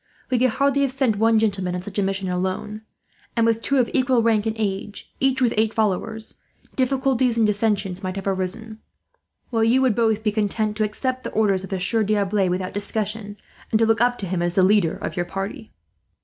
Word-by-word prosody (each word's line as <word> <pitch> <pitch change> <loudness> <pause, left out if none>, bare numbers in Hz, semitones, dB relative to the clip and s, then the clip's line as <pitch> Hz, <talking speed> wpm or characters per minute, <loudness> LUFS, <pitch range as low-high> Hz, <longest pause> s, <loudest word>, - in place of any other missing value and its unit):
We 250 - +2
could 255 +1 +4
hardly 280 +4 +1
have 275 -2 +1
sent 260 -5 +1
one 225 +1 +4
gentleman 195 -4 0
on 180 - -3
such 205 +1 -4
a - - +3
mission, 195 0 -2
alone; 185 +4 -3 0.6
and 230 - +4
with 230 0 +1
two 275 - +1
of 250 -2 +3
equal 255 -3 +2
rank 225 -1 +2
and 220 - -1
age, 205 -1 -4
each 265 -1 +2
with 240 - +2
eight 220 0 +1
followers, 220 +1 -1 0.4
difficulties 260 -2 +1
and 225 - +4
dissensions 205 -3 0
might 185 -1 -4
have 195 - -5
arisen; 200 +4 -2 0.7
while 225 -2 +1
you 235 +4 +4
would 255 -4 +3
both 220 -1 +1
be 215 - +1
content 210 0 -1
to 215 - +1
accept 255 +5 -2
the - - -4
orders 200 -4 +2
of 190 - -8
the 190 -2 -2
Sieur 220 +5 +1
D'Arblay 205 -2 +1
without 185 +1 -2
discussion, 205 0 -4 0.3
and 220 - +2
to 225 - +3
look 225 -1 +2
up 245 0 +3
to 200 - -4
him 180 -1 -2
as 175 0 -1
the 190 - +4
leader 190 -4 +3
of - - -5
your 175 - -1
party." 195 +4 -5
215 Hz, 215 wpm, -22 LUFS, 195-230 Hz, 0.7 s, could